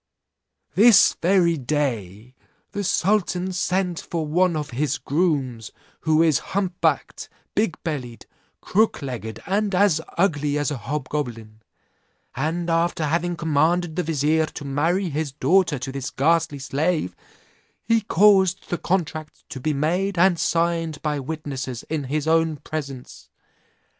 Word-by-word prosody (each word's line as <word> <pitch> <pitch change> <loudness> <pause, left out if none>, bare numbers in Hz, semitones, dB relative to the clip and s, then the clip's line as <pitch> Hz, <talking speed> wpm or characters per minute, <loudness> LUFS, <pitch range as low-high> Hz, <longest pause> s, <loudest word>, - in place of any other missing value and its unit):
"This 215 +5 +6
very 175 -2 +3
day 120 -6 -3 0.4
the 205 - -3
sultan 190 -1 +1
sent 180 -1 -1
for 165 -2 -3
one 175 +3 +2
of 150 -3 -4
his 140 +4 -1
grooms, 140 -8 -1 0.3
who 160 0 +3
is 155 -5 +3 0.2
hump 185 -3 -2
backed, - - 0 0.2
big 205 -6 0
bellied, 130 -7 -5 0.4
crook 215 -6 +1
legged, 115 -5 -6
and 200 0 0
as 180 -4 +3 0.2
ugly 150 -5 +1
as 145 +1 0
a 145 - -3
hobgoblin; 120 -4 -4 0.7
and 160 +6 -2
after 165 -1 +1
having 170 +3 0
commanded 165 +1 +1
the 180 - +1
vizier 155 0 +1
to 145 - -8
marry 165 +7 0
his 145 -1 -3
daughter 175 0 +2
to 130 +1 -5
this 135 -1 -4
ghastly 165 +1 +1
slave, 140 - -1 0.7
he 230 +1 +2
caused 195 -2 +3
the 175 - -1
contract 155 -4 -3
to 130 - -6
be 155 +4 -1
made 180 +7 0
and 175 -1 +4
signed 165 -2 0
by 150 -2 -1
witnesses 135 -4 -5
in 150 -3 -1
his 150 +3 -2
own 160 -1 +2
presence. 140 -4 -7
160 Hz, 135 wpm, -23 LUFS, 140-175 Hz, 0.7 s, This